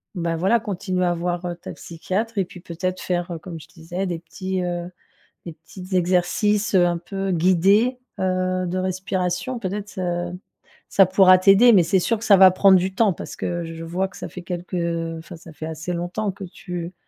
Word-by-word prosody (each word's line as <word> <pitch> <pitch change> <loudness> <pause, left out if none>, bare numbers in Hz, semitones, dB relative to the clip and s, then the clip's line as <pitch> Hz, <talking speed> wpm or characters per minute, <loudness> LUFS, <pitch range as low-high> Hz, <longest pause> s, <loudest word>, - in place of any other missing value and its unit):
bah, 170 -2 -2
voilà 195 +7 +3
continuer 185 -3 -2
à 175 - +2
voir, 175 +1 -3
heu, 175 -1 -3
ta 170 - -9
psychiatre 200 +7 -4
et 195 - +2
puis 180 0 -13
peut-être 185 +2 -4
faire, 175 0 -2
heu, 170 - -4
comme 165 0 -8
je - - -14
disais 175 +2 -5
des 170 -2 -3
petits 185 +2 -4
heu, 175 0 -3 0.6
des 170 - -7
petites 180 +4 -11
exercices, 185 +4 +1
heu, 180 -2 +5
un 175 -1 +1
peu 195 +3 -4
guidés, 190 +8 +3 0.2
heu, 185 0 0
de 180 +2 -2
respiration. 185 +4 -2
Peut-être 205 -1 -4
ça 175 -2 -3 0.6
ça 195 - +6
pourra 185 -1 +6
t'aider. 195 +6 +6
Mais 185 - +6
c'est 180 +3 +2
sûr 230 +6 0
que 225 - -9
ça 200 - +7
va 190 0 +9
prendre 190 +1 +5
du 185 +1 -1
temps 210 -2 +3
parce - - -8
que 175 0 -3
je 165 - -7
je 165 - -7
vois 180 +3 -1
que 180 - -14
ça - - -6
fait 180 - -9
quelques 175 +1 -6
heu, 165 -1 -2
enfin 165 +2 -10
ça 165 0 -14
fait 155 - -7
assez 160 +2 -5
longtemps 180 +5 -2
que 195 +1 -10
tu 175 -1 -7
180 Hz, 210 wpm, -22 LUFS, 175-190 Hz, 0.6 s, va